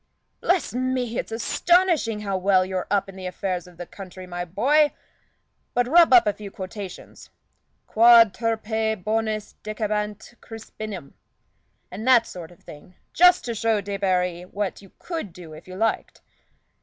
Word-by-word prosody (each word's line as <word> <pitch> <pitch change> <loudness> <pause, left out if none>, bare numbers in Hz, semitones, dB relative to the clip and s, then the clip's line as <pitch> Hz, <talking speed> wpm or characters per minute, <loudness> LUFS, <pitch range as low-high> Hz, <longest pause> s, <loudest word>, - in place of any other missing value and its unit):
"Bless 355 -8 0
me! 250 -2 -1
it's - - -5
astonishing 310 - +1
how 200 -2 -2
well 185 0 +3
you're 185 -1 -3
up 200 -1 +1
in 195 - -11
the 185 -1 -6
affairs 180 -1 -4
of 180 -1 -17
the 175 - -7
country, 185 0 -10
my 175 -1 -5
boy. 280 - +2 0.8
But 245 0 +2
rub 335 +3 +6
up 245 -2 +7
a 210 - +1
few 205 -1 -9
quotations 190 0 -9 0.6
'Quod 230 -2 +6
turpe 220 -2 -2
bonis 215 0 -2
decebat 210 0 -3
Crispinum' 215 -7 -9 0.8
and 210 +6 -6
that 245 -3 +6
sort 170 -3 -9
of 175 - -19
thing 165 +5 -14 0.2
just 360 +1 +5
to 235 - -2
show 225 -1 +1
Debarry 185 -3 -1
what 200 -1 -3
you 195 - -17
could 325 - -5
do 165 -2 -12
if 155 - -13
you 185 - -9
liked. 225 +4 -2
210 Hz, 155 wpm, -24 LUFS, 185-230 Hz, 0.8 s, up